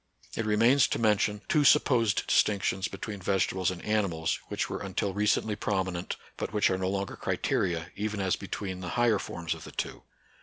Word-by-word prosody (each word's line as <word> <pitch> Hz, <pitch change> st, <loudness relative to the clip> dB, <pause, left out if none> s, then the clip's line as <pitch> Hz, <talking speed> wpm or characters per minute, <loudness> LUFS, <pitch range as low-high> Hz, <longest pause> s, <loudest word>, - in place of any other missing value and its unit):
It 115 Hz, -, -2 dB
remains 115 Hz, +6 st, +5 dB
to -, -, -1 dB
mention 105 Hz, -1 st, +1 dB
two 150 Hz, -, +3 dB
supposed 120 Hz, -7 st, +4 dB
distinc 100 Hz, -3 st, +3 dB
tions 95 Hz, 0 st, 0 dB
between 105 Hz, -3 st, -6 dB
vegetables 95 Hz, -1 st, +1 dB
and 90 Hz, -2 st, -6 dB
animals 95 Hz, -7 st, 0 dB
which -, -, -2 dB
were -, -, -5 dB
until 95 Hz, 0 st, -2 dB
recently 105 Hz, +1 st, +1 dB
prominent, 95 Hz, -4 st, -2 dB, 0.2 s
but -, -, -3 dB
which 105 Hz, -2 st, +2 dB
are 95 Hz, -, +1 dB
no 95 Hz, 0 st, 0 dB
longer 100 Hz, 0 st, -2 dB
criteria, 85 Hz, -1 st, -1 dB
even 105 Hz, 0 st, -3 dB
as 95 Hz, -2 st, +1 dB
between 95 Hz, -2 st, -5 dB
the 90 Hz, -1 st, -5 dB
higher 120 Hz, -4 st, +3 dB
forms 85 Hz, -3 st, -4 dB
of 80 Hz, -1 st, -10 dB
the -, -, -9 dB
two. -, -, -4 dB
100 Hz, 185 wpm, -29 LUFS, 95-105 Hz, 0.2 s, remains